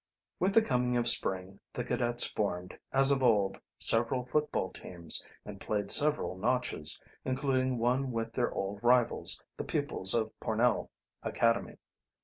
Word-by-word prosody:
With 195 +2 0
the 225 - +5
coming 125 - -1
of 120 0 0
spring 95 -4 +2
the - - -4
cadets 120 0 +2
formed, 90 -4 -4 0.2
as 135 +1 +6
of 135 -1 +1
old, 105 -6 +1 0.2
several 120 +2 +1
football 150 -8 -2
teams, 85 -2 -2 0.2
and 100 -1 -10
played 100 -2 -1
several 150 -10 +3
notches, 105 -7 +1 0.2
including 130 -1 -1
one 125 +3 -1
with 115 -1 -4
their 120 - -1
old 100 +1 -5
rivals, 120 0 +2
the - - -4
pupils 95 +3 +1
of 110 -1 -1
Pornell 115 +1 -1 0.3
Academy. 115 0 -1
120 Hz, 140 wpm, -30 LUFS, 100-130 Hz, 0.3 s, as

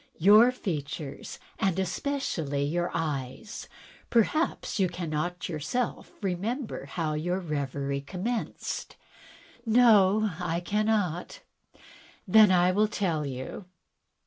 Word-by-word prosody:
"Your 210 +8 +7
features, 155 - -5 0.2
and 190 -2 +1
especially 175 - -1
your 175 +4 0
eyes. 145 - -4 0.4
Perhaps 245 +3 +1
you 185 -2 +3
cannot 175 0 -3
yourself 180 - -3
recall 210 +7 -3
how 160 -3 -2
your 175 +4 -1
reverie 140 -4 -3
commenced?" 190 - -4 0.4
" - - -22 0.2
No, 215 -3 +5
I 170 -1 -1
cannot." 205 - -1 0.9
"Then 215 +2 +7
I 180 0 +4
will 210 +3 +3
tell 170 -8 -1
you. 130 +8 -6
180 Hz, 100 wpm, -28 LUFS, 155-215 Hz, 0.9 s, Your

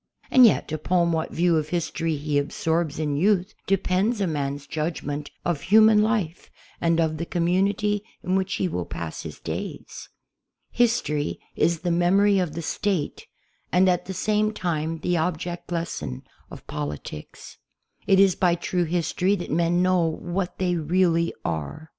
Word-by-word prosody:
And 255 -2 +8
yet, 205 - 0
upon 170 +2 +1
what 160 -1 -1
view 170 -1 +2
of 155 -1 -2
history 165 -1 -1
he 145 0 0
absorbs 160 +2 -1
in 150 -2 -1
youth 190 +4 +2
depends 195 +4 +1
a 200 - +1
man's 145 -3 -3
judgment 150 -2 -3 0.2
of 165 -5 0
human 215 +1 +6
life 210 -7 -1 0.3
and 165 0 +2
of 160 -1 +1
the 170 - -3
community 195 +4 +1 0.2
in 185 - 0
which 190 0 0
he 185 - 0
will 90 - -3
pass 85 -2 -5
his - - -8
days. - - -6 0.6
History 220 -12 0 0.2
is 165 0 +1
the 175 0 0
memory 195 +4 +4
of 175 -5 -1
the 170 - -4
State 185 -2 -2 0.4
and 180 +3 +4
at 180 -1 +1
the 190 - -4
same 215 +3 +1
time 165 -4 -2
the 175 +2 +1
object 175 +1 -3
lesson 165 - -4 0.3
of - - -11
politics. 75 0 -7 0.5
It 195 -1 +5
is 195 -2 +6
by 175 -1 +2
true 175 +1 -1
history 180 +3 0
that 175 - -6
men 170 +3 +2
know 185 -1 +3
what 175 +3 -3
they 180 -2 0
really 170 +1 +2
are. 80 - -4
175 Hz, 160 wpm, -24 LUFS, 155-190 Hz, 0.6 s, And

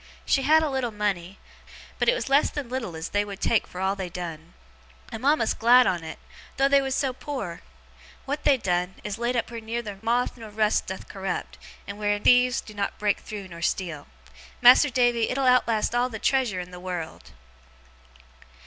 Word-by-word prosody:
She 275 - +2
had 310 +4 +4
a 310 - 0
little 265 -3 -1
money, 200 -4 -3 0.6
but - - +3
it - - +3
was - - -4
less 275 +2 +4
than 285 -5 -6
little 240 -9 -4
as 160 +2 -5
they 205 0 +1
would 200 -1 -8
take 225 - +1
for 180 - -9
all 190 +1 0
they 190 -2 -5
done. 165 -2 -7 0.6
I'm 225 +1 -7
a'most 280 -5 +2
glad 245 +2 +6
on 175 -5 0
it, 160 0 -7 0.4
though 270 +1 +4
they 280 0 +4
was 265 -1 -2
so 270 -2 0
poor! 250 - -6 0.6
What 290 +2 -3
they 280 -2 +4
done, 180 -3 -1
is 210 +1 -5
laid 240 +1 -1
up 235 0 -1
wheer 230 - -5
neither 220 -3 -5
moth 240 +2 0
or 220 -1 -9
rust 215 0 +1
doth 190 - -7
corrupt, 195 -2 -5 0.3
and 200 +1 -8
wheer 205 0 +1
thieves 250 +3 +4
do 215 - -12
not 200 -1 -3
break 205 -1 0
through 205 -3 -8
nor 170 -1 -10
steal. 165 -4 -2 0.5
Mas'r 255 +4 +7
Davy, 240 -2 +2
it'll 270 +1 -1
outlast 235 -4 +3
all 245 +1 +1
the 220 - -6
treasure 245 -5 +1
in 180 0 -7
the 180 0 -10
wureld. 175 -3 -6
220 Hz, 195 wpm, -25 LUFS, 190-250 Hz, 0.6 s, Mas'r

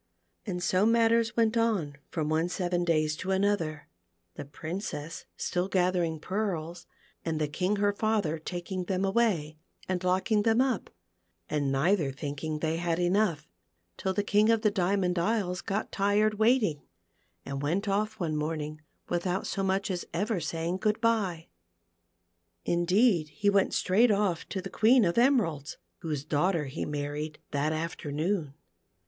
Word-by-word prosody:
And 180 -2 -3
so 185 +2 +2
matters 230 0 +3
went 225 0 +3
on 210 -11 +1
from 155 -3 -2
one 160 +3 +1
seven 175 -1 -1
days 155 -3 +1
to 185 - -5
another, 190 -6 0 0.5
the - - -7
Princess 160 +2 -6
still 180 +1 -1
gathering 180 -4 +1
pearls, 175 -3 -3 0.4
and 160 -2 -2
the 150 - +1
King 180 +7 0
her 205 0 +2
father 205 -7 0
taking 180 +2 -4
them 190 +1 0
away, 190 -8 +1 0.3
and 185 -1 -2
locking 190 +4 +2
them 225 +2 +3
up, 255 -5 +1 0.6
and 145 -2 0
neither 150 +2 +2
thinking 145 +3 -4
they 160 +1 -1
had 170 -1 0
enough, 180 -2 +1 0.5
till 190 - -2
the 200 +2 0
King 210 +2 +3
of 225 -1 +3
the 210 - +4
Diamond 185 -2 +1
Isles 185 -1 0
got 210 0 -3
tired 205 +2 +2
waiting, 220 - +3 0.6
and 140 0 -4
went 175 +9 -1
off 215 +2 0
one 160 -4 -1
morning 155 0 -3 0.3
without 180 +2 -1
so 195 - -2
much 195 0 0
as 180 -1 -2
ever 210 -2 0
saj 165 +1 -3
ing 180 +2 -1
good 210 +2 0
bye. 210 -8 0 1.2
Indeed 175 0 +3
he 200 +8 +1
went 200 -1 +2
straight 220 +7 +4
off 200 -5 0
to 190 -2 -4
the 195 - -7
Queea 230 -1 +5
of 170 +7 +1
Emeralds, 195 - +2 0.2
whose 150 -4 -3
daughter 160 +1 +1
he 135 - -4
married 150 +1 -4
that 145 +2 0
afternoon. 155 0 -2
180 Hz, 155 wpm, -29 LUFS, 155-205 Hz, 1.2 s, Queea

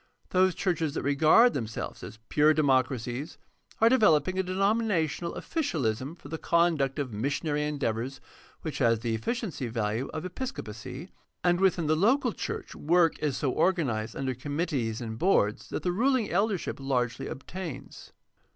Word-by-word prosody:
Those 185 -1 +3
churches 165 -5 -1
that - - -2
regarded 155 - +5
themselves 110 -3 -4
as - - -9
pure 150 +1 +4
democracies 130 0 0 0.4
are 225 - +6
developing 185 - +4
a - - +5
denominational 190 -3 0
officialism 145 - -2
for 160 - -13
the 160 +2 -5
conduct 165 -5 +2
of 135 -6 -3
missionary 145 +6 -1
endeavors 130 -3 -2 0.4
which 155 - -4
has 115 -4 +3
the 115 -1 -1
efficiency 160 - -3
value 115 +2 -2
of 155 - -5
episco 255 +9 -5
pacy; 125 - -8 0.3
and 175 0 +3
within 185 -3 +2
the 155 +1 +3
local 240 - +2
church - - -5
work 165 +1 +2
is 145 -4 -1
so 135 - 0
organized 130 -12 0
under 135 -1 -2
committees 135 -4 -2
and 110 -1 -5
boards 105 - +2
that - - -4
the 180 - +1
ruling 245 +3 +1
eldership 195 -3 0
largely 125 -3 -1
obtains. 165 +2 -8
150 Hz, 150 wpm, -28 LUFS, 125-185 Hz, 0.4 s, are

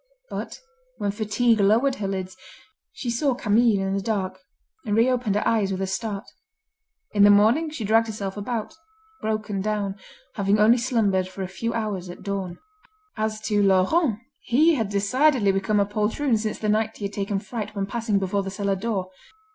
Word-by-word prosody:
But - - -5 0.4
when 200 - -1
fatigue 220 +2 +1
lowered 225 +7 +3
her 200 - -3
lids, 190 -1 -4 0.6
she 240 - -4
saw 260 +2 +1
Camille 220 -3 +3
in 195 - -1
the 195 - -1
dark, 190 -3 -2 0.4
and 210 -4 -1
reopened 240 -3 +2
her 210 - 0
eyes 215 -4 +2
with 190 - -2
a 195 - 0
start. 200 +1 -3 0.9
In 205 - +1
the 205 - +8
morning 220 +11 +4
she 300 -7 -6
dragged 225 +2 +3
herself 200 -3 -4
about, 215 +2 -4 0.5
broken 215 -2 -2
down, 205 -1 -2 0.4
having 200 0 +1
only 225 +4 +5
slumbered 215 -7 +1
for 190 +1 -6
a - - -3
few 210 +5 -3
hours 205 -5 -3
at 175 - -10
dawn. 195 -3 -4 0.6
As 215 -1 -2
to 210 -1 +1
Laurent, 200 - +3 0.2
he 310 +8 +3
had 225 -8 -1
decidedly 210 +3 +3
become 195 +2 +1
a 200 - +3
poltroon 215 +6 0
since 215 0 -2
the 215 - -3
night 215 +1 +1
he 205 - -5
had 200 - -4
taken 200 0 -2
fright 210 0 -5
when 200 -1 -1
passing 220 0 -1
before 195 +1 0
the 195 - -5
cellar 200 0 -1
door. 195 -2 -3
210 Hz, 180 wpm, -24 LUFS, 195-230 Hz, 0.9 s, the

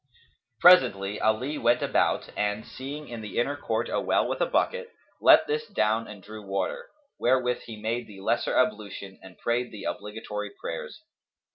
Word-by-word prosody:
Presently 105 - +5
Ali 125 +7 +1
went 120 +1 +3
about - - +1
and, 105 +1 -1
seeing 145 +3 -7
in 120 -2 -7
the 105 - -7
inner 140 +4 +1
court 145 - -2
a - - -1
well - - +2
with - - -3
a - - +3
bucket, 485 0 0 0.3
let - - +7
this 455 +1 -2
down 110 +2 +1
and 100 -3 -11
drew 110 +1 -9
water, 95 -2 -3 0.3
wherewith 125 0 +2
he 110 -2 -8
made 115 +3 -2
the 100 -2 -12
lesser 115 +4 0
ablution 105 -5 -1
and 95 -1 -14
prayed 120 +1 -1
the 105 -3 -9
obligatory 105 0 -5
prayers. 485 -9 -6
110 Hz, 165 wpm, -27 LUFS, 105-130 Hz, 0.3 s, let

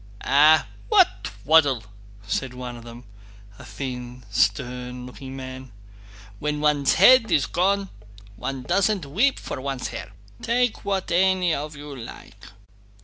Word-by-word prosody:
"Eh, 155 +3 +6 0.3
what 390 - +3
twaddle!" 130 +5 +2 0.4
said 125 +4 -3
one 125 -1 -6
of 120 - -11
them, 120 +1 -11 0.6
a - - -11
thin, 125 +2 -7
stern 125 +2 -1
looking 130 +1 -9
man. 130 -1 -8 0.7
"When 150 0 -2
one's 150 -2 +2
head 230 +3 +6
is 155 -4 +3
gone 195 +2 0 0.5
one 135 +4 -5
doesn't 190 +2 +1
weep 220 - +1
for - - -6
one's 135 -2 -4
hair! - - -8 0.3
Take 245 0 0
what 195 -2 -2
any 185 -1 +3
of 150 +1 -4
you 145 0 -9
like!" 115 -3 -11
140 Hz, 135 wpm, -24 LUFS, 125-180 Hz, 0.7 s, Eh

